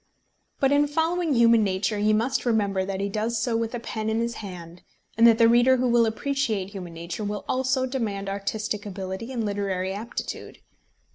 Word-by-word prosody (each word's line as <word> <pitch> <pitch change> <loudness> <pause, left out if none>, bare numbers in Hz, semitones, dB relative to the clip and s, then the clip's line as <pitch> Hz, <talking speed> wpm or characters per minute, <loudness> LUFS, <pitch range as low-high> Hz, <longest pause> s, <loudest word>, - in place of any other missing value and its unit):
But 270 0 +3
in 290 +1 +4
following 325 +1 0
human 230 -1 +5
nature 195 +2 -1
he 210 +1 +3
must 240 +5 +1
remember 205 -5 +1
that 190 0 -4
he 200 - -1
does 220 +3 -2
so 230 +1 0
with 230 +1 -1
a - - -3
pen 220 -1 -4
in 220 +1 0
his 235 0 -1
hand, 175 -3 -9 0.3
and 230 +1 +6
that 230 -1 +6
the 230 -1 +6
reader 240 +3 +5
who 255 0 +1
will 235 -1 +4
appreciate 220 -4 -1
human 180 -4 -8
nature 170 +5 -5
will 205 0 -4
also 260 0 +1
demand 220 -7 -3
artistic 205 +1 -3
ability 195 +3 -6
and 235 -4 -2
literary 195 -2 -2
aptitude. 220 +4 -6
220 Hz, 190 wpm, -25 LUFS, 200-240 Hz, 0.3 s, and